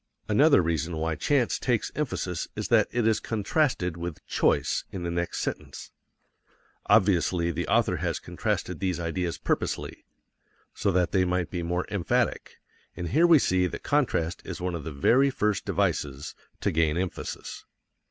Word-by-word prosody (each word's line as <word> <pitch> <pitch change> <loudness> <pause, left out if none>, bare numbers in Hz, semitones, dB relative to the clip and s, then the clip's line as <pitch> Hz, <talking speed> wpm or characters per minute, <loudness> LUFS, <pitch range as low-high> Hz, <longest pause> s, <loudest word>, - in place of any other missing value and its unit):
Another 140 - +5
reason 80 0 -1
why 80 +1 -1
chance 130 - +1
takes 120 -4 0
emphasis 95 - -3
is - - -4
that - - +4
it 120 -2 0
is 110 -1 +3
contrasted 110 - 0
with 85 -2 -6
choice - - +1
in 95 -2 -5
the 85 - -2
next 85 0 -2
sentence. - - -5 1.0
Obviously, 90 -5 +3
the 85 +2 -3
author - - +2
has - - -1
contrasted - - -3
these 90 -3 -1
ideas 85 +1 -2
purposely, - - -2 0.7
so 100 - 0
that 90 -1 +1
they 95 - +3
might 90 -1 -1
be 90 - -3
more 90 +2 -1
emphatic, 100 -5 -1 0.4
and 85 -1 -3
here 165 +6 +4
we 165 -2 +8
see 90 -8 +2
that - - -7
contrast 90 - 0
is - - -6
one 90 0 -2
of 85 -3 -4
the 80 - -4
very 125 - +3
first 105 -6 -1
devices 70 0 -1 0.3
to - - +1
gain 80 0 +1
emphasis. 90 0 -5
90 Hz, 160 wpm, -27 LUFS, 85-110 Hz, 1.0 s, we